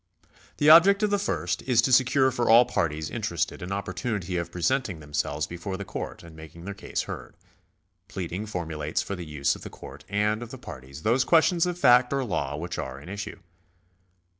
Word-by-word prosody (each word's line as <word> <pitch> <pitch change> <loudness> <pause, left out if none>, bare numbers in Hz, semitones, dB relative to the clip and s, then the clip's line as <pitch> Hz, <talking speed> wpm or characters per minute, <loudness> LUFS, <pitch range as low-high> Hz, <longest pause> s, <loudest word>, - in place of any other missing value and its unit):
The 145 - +2
object 190 +6 +8
of 210 - +2
the 205 - +2
first 90 - -2
is 125 -3 +1
to 130 - +1
secure 130 +1 +4
for 120 -1 -1
all 120 +2 +8
parties 80 -9 -2
interested - - -2
an 90 +2 -6
opportunity 100 -2 -3
of 85 0 -3
presenting 95 0 -1
themselves 75 0 -2
before 90 +4 -6
the 100 - -6
court - - -6
and 85 -1 -13
making 80 +2 -12
their 100 - -4
case - - -4
heard. - - -8 0.7
Pleading 95 +3 -5
formulates 80 -6 -3
for 100 - -4
the 90 -3 -7
use 70 -2 0
of - - -12
the - - -8
court - - -12
and 105 +2 0
of 120 - -7
the 130 - -8
parties 70 - -10
those 120 +4 +3
questions 170 +4 +3
of 175 -1 -3
fact 125 -5 +5
or 135 -1 0
law 75 - -2
which 85 +3 -5
are 65 0 -5
in 75 - -12
issue. 100 0 -6
100 Hz, 195 wpm, -26 LUFS, 80-125 Hz, 0.7 s, object